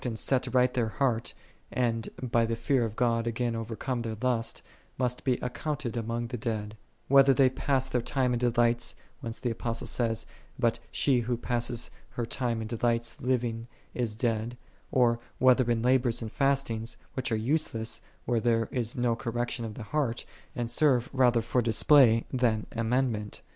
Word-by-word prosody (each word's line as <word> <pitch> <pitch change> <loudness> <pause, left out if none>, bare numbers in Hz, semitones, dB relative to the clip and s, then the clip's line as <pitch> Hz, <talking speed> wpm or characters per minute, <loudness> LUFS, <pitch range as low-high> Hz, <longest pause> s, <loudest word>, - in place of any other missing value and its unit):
ind 120 -3 -2
set 130 +3 +2
right 125 0 +3
their 120 -3 +1
heart, 120 -1 -1 0.4
and 115 -2 0
by 120 -2 +2
the 115 0 0
fear 120 +2 +1
ot 110 - -9
(,(nl 115 -1 +1
again 115 0 -1
overcome 115 +3 -3
their 115 -1 -4
lust, 115 -3 -1 0.3
must 125 -1 -1
be 130 - +2
accounted 125 0 -3
among 115 +1 -2
the 125 +1 -5
dead; 110 -2 -3 0.3
whether 135 0 +6
they 130 0 +5
pass 130 0 0
their 125 -2 0
time 125 0 0
in 120 - 0
delights, 120 -1 +2 0.2
whence 115 -4 -5
the 120 -2 -2
Apos 115 0 -3
tle - - -4
says, 115 -2 0 0.2
" - - -27
But 115 -2 +2
she 135 -3 +2
who 120 +1 -1
passes 120 0 -1 0.3
her 120 - 0
time 115 -1 -1
in - - -5
de 115 -1 -4
lights, 120 -1 0
living, 120 -2 -1 0.3
is 115 -4 -1
dead;"4 115 0 -1 0.4
or 120 -2 +3 0.2
whether 130 -1 +4
in 115 -1 +1
labors 125 -2 +2
and 110 - -6
fastings, 135 -5 0 0.2
which 130 -1 -2
are - - +2
useless 115 -2 -1 0.2
where 120 -1 +1
there 115 -1 +1
is 120 -3 -1
no 120 -1 +2
correction 120 +1 -2
of 110 -2 -6
the 120 - -7
heart, 125 -1 -1 0.3
and 120 -1 -3
serve 130 -2 +3
rather 125 -3 +3
for 125 - +1
display 115 +1 +5
than 115 -4 +1
amendment. 115 -2 -1
120 Hz, 180 wpm, -29 LUFS, 115-125 Hz, 0.4 s, whether